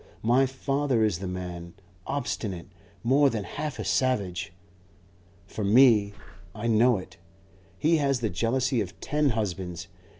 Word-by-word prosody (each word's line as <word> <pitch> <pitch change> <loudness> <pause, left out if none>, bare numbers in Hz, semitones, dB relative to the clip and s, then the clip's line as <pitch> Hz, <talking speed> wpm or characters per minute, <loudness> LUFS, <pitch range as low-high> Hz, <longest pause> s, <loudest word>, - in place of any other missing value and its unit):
My 125 +4 +4
father 135 -2 0
is 105 -6 +1
the 95 - -5
man, 90 -2 -6 0.3
obstinate, 105 -10 -3 0.4
more 135 +4 +4
than 110 -5 -3
half 150 - -5
a - - -5
savage. 100 -10 0 0.9
For 105 +2 -6
me 105 -1 +5 0.4
I 110 +1 -6
know 115 +1 +4
it 95 - -10 0.6
he 160 +2 +3
has 140 -3 +1
the 115 -2 -1
jealousy 120 +6 0
of 95 -2 -7
ten 150 0 +1
husbands. 90 -4 -4
115 Hz, 135 wpm, -27 LUFS, 95-135 Hz, 0.9 s, me